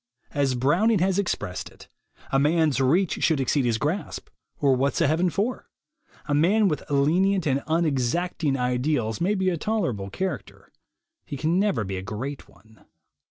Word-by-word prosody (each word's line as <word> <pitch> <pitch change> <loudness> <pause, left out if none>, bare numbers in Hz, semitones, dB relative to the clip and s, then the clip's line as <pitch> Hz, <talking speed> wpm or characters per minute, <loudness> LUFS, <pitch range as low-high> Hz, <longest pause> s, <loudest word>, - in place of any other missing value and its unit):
As 140 -3 0
Browning 175 - +2
has 190 +2 +1
expressed 130 - -3
it, - - -17 0.4
"A 135 - +3
man's 150 -1 +2
reach 165 +7 +1
should 160 -4 +3
exceed 135 +1 +1
his 115 -2 +1
grasp, 155 - -3 0.3
or 140 -2 +3
what's 135 +2 0
a - - +3
heaven 165 +5 +2
for?" 205 - -3 0.6
A 145 - -2
man 195 +9 +3
with 155 -5 -1
lenient 175 +7 +2
and 140 -1 +1
unexacting 155 -1 0
ideals 125 -1 -1
may 195 +5 +2
be 190 -1 +1
a 170 - -2
tolerable 160 - -2
character; 190 - -5 0.5
he 145 - -7
can 160 +6 +1
never 200 - +1
be 95 -1 -4
a - - -4
great 120 +9 -6
one. 110 +2 -22
150 Hz, 160 wpm, -25 LUFS, 130-180 Hz, 0.6 s, A